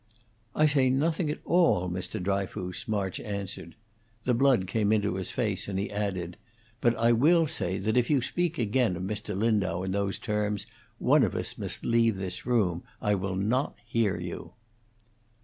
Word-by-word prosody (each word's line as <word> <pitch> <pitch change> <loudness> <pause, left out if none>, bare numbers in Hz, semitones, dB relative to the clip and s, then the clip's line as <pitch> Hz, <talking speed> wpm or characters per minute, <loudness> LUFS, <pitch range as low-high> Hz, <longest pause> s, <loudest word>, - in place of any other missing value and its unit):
"I 155 - +4
say 140 -4 +4
nothing 155 +5 +1
at 150 - -2
all, 165 - +3
Mr. 90 +1 -4
Dryfoos," 95 +2 -3
March 100 -4 -1
answered. 100 -5 -5 0.5
The 125 - +2
blood 125 -5 +3
came 105 +2 +1
into 105 -3 +2
his 95 -1 -3
face, - - -1
and 100 -2 -3
he 100 - -2
added: 95 -4 -3 0.4
"But 120 0 +3
I 115 +1 +3
will 160 +8 +5
say 95 - -2
that 105 +3 -1
if 125 -1 +2
you 145 -3 +4
speak 170 +6 -1
again 115 -3 +1
of 90 - -5
Mr. 105 0 -3
Lindau 100 -4 +1
in 95 - -2
those 100 0 -1
terms, 105 -1 -1 0.3
one - - +4
of - - +1
us - - -2
must - - -5
leave 115 -3 +3
this 95 +3 -5
room. 100 -9 +2 0.2
I 105 - +1
will 95 -1 -1
not 115 +9 0
hear 115 -5 +1
you." 85 0 -6
105 Hz, 175 wpm, -28 LUFS, 95-120 Hz, 0.5 s, will